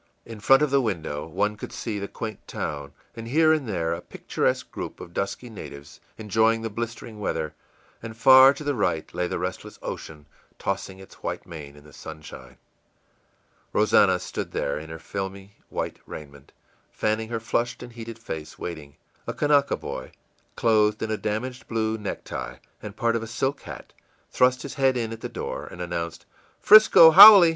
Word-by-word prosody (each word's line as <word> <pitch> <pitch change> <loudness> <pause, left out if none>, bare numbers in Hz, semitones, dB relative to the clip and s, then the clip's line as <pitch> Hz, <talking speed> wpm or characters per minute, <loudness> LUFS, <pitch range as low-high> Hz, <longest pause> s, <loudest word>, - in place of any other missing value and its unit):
In 115 -2 -9
front 135 +7 +5
of 150 - 0
the 140 -1 +4
window 80 - -3
one 105 +5 -1
could - - -8
see 110 -3 -4
the 100 - -4
quaint 110 -1 -7
town, 70 -1 -5 0.2
and 115 0 -7
here 155 +5 +4
and 145 -7 -2
there 85 -4 -1
a 85 - -5
picturesque - - -2
group - - -7
of 85 - -10
dusky 100 +6 -3
natives, 75 -10 -10 0.2
enjoying 110 +1 +1
the 115 - -3
blistering 115 0 -6
weather; 80 -6 -2 0.5
and 115 -1 -8
far 130 +3 +8
to 150 - -8
the 145 0 0
right 90 - -1
lay 90 0 -1
the - - -3
restless - - -5
ocean, 75 -2 -7 0.3
tossing 95 0 -3
its 95 0 -15
white - - -4
mane 75 -4 -10
in 75 - -16
the 75 -1 -17
sunshine. 75 -1 -11 1.2
Rosannah - - +4
stood - - -6
there, 70 - -1
in 80 +1 -10
her 80 - -7
filmy 95 +2 -7
white - - -4
raiment, 70 -2 -11 0.4
fanning 110 +1 -2
her 115 -1 -2
flushed 120 +2 -2
and 120 -1 -11
heated 115 -1 -8
face, 80 -9 -7
waiting. 75 -5 -7 0.3
A - - -2
Kanaka 145 -1 +2
boy, - - -7 0.4
clothed 105 -2 +2
in 110 - -2
a - - +1
damaged 125 +5 -4
blue 110 -1 -1
necktie 105 - -5 0.3
and 105 -1 -9
part 115 0 +1
of 115 - -1
a 115 - -6
silk 135 +5 -2
hat, - - -10 0.4
thrust 125 0 +3
his 140 - -6
head 135 -2 +2
in 115 -2 -2
at 115 - -10
the - - -5
door, - - -5
and - - -11
announced, 85 -1 -4 0.4
ì'Frisco 210 -6 +9
haole! 200 -2 +11
110 Hz, 180 wpm, -25 LUFS, 85-120 Hz, 1.2 s, haole